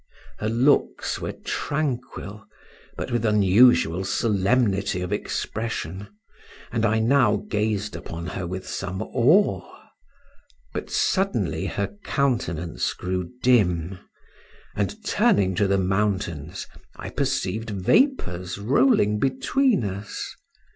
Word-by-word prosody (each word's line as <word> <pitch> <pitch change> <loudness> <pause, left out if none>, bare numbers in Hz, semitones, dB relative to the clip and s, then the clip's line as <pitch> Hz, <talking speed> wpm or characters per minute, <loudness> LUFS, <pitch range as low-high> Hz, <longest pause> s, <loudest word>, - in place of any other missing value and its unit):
Her 110 - -1
looks 125 +6 +2
were - - -3
tranquil, 125 -8 -3 0.5
but - - -4
with 120 -2 0
unusual 105 -3 +4
solemnity 100 -1 +1
of 90 +3 -3
expression, 100 -3 -4 0.6
and 115 0 +1
I 110 +1 +2
now 115 -1 +4
gazed 105 -1 -1
upon 85 0 -7
her 90 0 -4
with 95 +1 -6
some 95 +2 -4
awe; 145 - +2 1.0
but - - -5
suddenly 115 - 0
her 100 - -3
countenance 100 - -1
grew 90 -1 -3
dim, 95 -7 +2 0.8
and 205 - -3
turning 205 - +3
to 100 +3 +1
the 100 0 +2
mountains 95 -5 -1 0.3
I - - -7
perceived 110 +5 -1
vapours 95 - +1
rolling 105 -1 +3
between 140 - +1
us. 100 +1 -5
105 Hz, 105 wpm, -24 LUFS, 95-120 Hz, 1.0 s, unusual